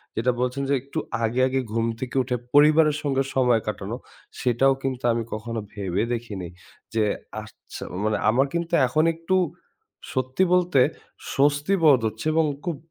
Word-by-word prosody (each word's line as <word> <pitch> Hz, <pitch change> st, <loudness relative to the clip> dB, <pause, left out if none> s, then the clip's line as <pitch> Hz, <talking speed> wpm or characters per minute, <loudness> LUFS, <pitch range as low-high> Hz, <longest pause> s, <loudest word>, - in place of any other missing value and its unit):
যেটা 120 Hz, +3 st, +2 dB
বলছেন 125 Hz, +2 st, -1 dB
যে, 140 Hz, -, +3 dB
একটু 140 Hz, +4 st, -5 dB, 0.2 s
আগে, 115 Hz, +3 st, 0 dB
আগে 130 Hz, 0 st, 0 dB
ঘুম 115 Hz, 0 st, 0 dB
থেকে 130 Hz, 0 st, -5 dB
উঠে 125 Hz, -, -2 dB, 0.2 s
পরিবারের 150 Hz, +1 st, +5 dB
সঙ্গে 135 Hz, -2 st, +1 dB
সময় 125 Hz, -4 st, +3 dB
কাটানো, 105 Hz, +2 st, -4 dB, 0.4 s
সেটাও 125 Hz, +2 st, +3 dB
কিন্তু 130 Hz, -2 st, -3 dB
আমি 115 Hz, 0 st, -1 dB
কখনো 115 Hz, +1 st, -4 dB
ভেবে 100 Hz, -1 st, -1 dB
দেখিনি। 105 Hz, -7 st, -5 dB, 0.5 s
যে 110 Hz, -1 st, +2 dB, 0.4 s
আচ্ছা 105 Hz, -, -11 dB, 0.2 s
মানে 110 Hz, 0 st, +1 dB
আমার 130 Hz, +5 st, +3 dB
কিন্তু 170 Hz, 0 st, -2 dB
এখন 155 Hz, +5 st, +2 dB
একটু 165 Hz, +3 st, -1 dB, 0.8 s
সত্যি 130 Hz, +7 st, 0 dB
বলতে 180 Hz, -6 st, +3 dB, 0.6 s
স্বস্তিবোধ 145 Hz, +1 st, +4 dB
হচ্ছে 110 Hz, +4 st, -6 dB
এবং 160 Hz, -1 st, +3 dB, 0.2 s
খুব 170 Hz, -2 st, -2 dB
130 Hz, 150 wpm, -24 LUFS, 115-150 Hz, 0.8 s, পরিবারের